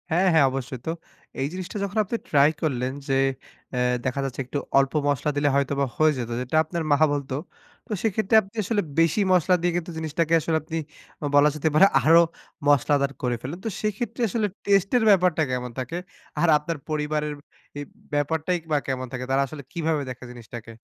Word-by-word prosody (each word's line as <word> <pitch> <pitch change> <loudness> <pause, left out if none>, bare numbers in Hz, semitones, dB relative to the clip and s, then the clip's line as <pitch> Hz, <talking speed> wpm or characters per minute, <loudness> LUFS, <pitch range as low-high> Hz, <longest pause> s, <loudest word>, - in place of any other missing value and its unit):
হ্যাঁ, 180 +4 +2
হ্যাঁ 155 -4 +6
অবশ্যই 130 -1 -5
তো। - - +1 0.5
এই 135 - +1
জিনিসটা 185 +2 -5
যখন 200 +2 -4
আপনি 220 +4 -3
ট্রাই 145 0 +5
করলেন 130 -5 -1 0.2
যে 135 - 0 0.6
অ্যাঁ 125 0 +1
দেখা 130 +2 -1
যাচ্ছে 135 -1 -5
একটু 130 +3 -4 0.2
অল্প 135 0 +1
মসলা 145 +1 0
দিলে 145 0 +3
হয়তোবা 140 0 +1
হয়ে 155 0 +5
যেত, 120 -2 -4
যেটা 125 +4 -4
আপনার 165 +1 -4
মা 145 - +5
বলত। 140 -2 -3 0.6
তো - - -12
সেক্ষেত্রে 220 0 +1
আপনি 195 +2 -17
আসলে 205 +1 0 0.2
বেশি 165 +5 +3
মসলা 180 +1 +4
দিয়ে 175 0 +1
কিন্তু 175 0 -4
জিনিসটাকে 160 +1 -1
আসলে 160 0 0
আপনি 160 +1 -4 0.6
বলা 145 +1 +6
যেতে 155 +1 0
পারে 155 +6 +7 0.2
আরো 165 +2 +7 0.5
মশলাদার 140 0 +3
করে 125 -1 0
ফেললেন। 145 +8 -6
তো - - 0
সেইক্ষেত্রে 215 +3 -3
আসলে 215 +1 0 0.2
টেস্ট 195 -1 +3
এর 240 - +1
ব্যাপারটা 180 -5 +4
কেমন 125 -1 -3
থাকে? 130 +7 -4 0.4
আর 170 - +3
আপনার 150 +2 -4
পরিবারের 150 0 -1 0.5
ই - - -4 0.3
ব্যাপারটাই 160 +4 0
বা 150 - +4
কেমন 130 -1 -2
থাকে 125 0 -4
তারা 135 +1 +3
আসলে 140 +1 -9
কিভাবে 160 -2 -1
দেখে 125 0 -8
জিনিসটাকে? 120 -1 -10
150 Hz, 185 wpm, -24 LUFS, 135-175 Hz, 0.6 s, পারে